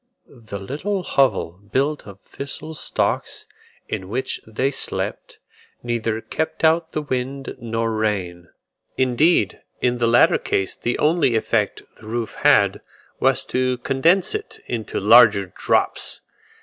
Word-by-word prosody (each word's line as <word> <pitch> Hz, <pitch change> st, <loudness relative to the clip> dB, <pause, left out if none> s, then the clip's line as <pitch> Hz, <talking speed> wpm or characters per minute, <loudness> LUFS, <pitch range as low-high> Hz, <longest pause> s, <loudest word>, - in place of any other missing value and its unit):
The 110 Hz, -6 st, -8 dB
little 165 Hz, -, -3 dB
hovel, 125 Hz, -, +1 dB
built 145 Hz, +1 st, 0 dB
of 100 Hz, -1 st, -12 dB
thistle 140 Hz, +3 st, -6 dB
stalks, 155 Hz, -, -2 dB, 0.4 s
in 95 Hz, 0 st, -5 dB
which 130 Hz, +5 st, -2 dB
they 130 Hz, +5 st, -1 dB
slept, -, -, -4 dB, 0.5 s
neither 115 Hz, -2 st, -2 dB
kept 160 Hz, +6 st, -4 dB
out 160 Hz, +1 st, +3 dB
the 155 Hz, -, -2 dB
wind 135 Hz, 0 st, -4 dB
nor 115 Hz, -1 st, -2 dB
rain; 95 Hz, -6 st, -2 dB, 0.5 s
indeed 130 Hz, -, +2 dB, 0.2 s
in 125 Hz, -1 st, 0 dB
the 120 Hz, -, +2 dB
latter 120 Hz, +1 st, +5 dB
case 95 Hz, -, -1 dB
the 120 Hz, -, -2 dB
only 150 Hz, -5 st, +2 dB
effect 110 Hz, -, 0 dB
the 110 Hz, -, -14 dB
roof 115 Hz, -1 st, -3 dB
had, -, -, +4 dB, 0.4 s
was -, -, +2 dB
to 130 Hz, 0 st, 0 dB
condense 145 Hz, -, +2 dB
it 430 Hz, 0 st, -5 dB
into 115 Hz, -4 st, -3 dB
larger 105 Hz, -3 st, +6 dB
drops. -, -, 0 dB
120 Hz, 130 wpm, -22 LUFS, 110-140 Hz, 0.5 s, larger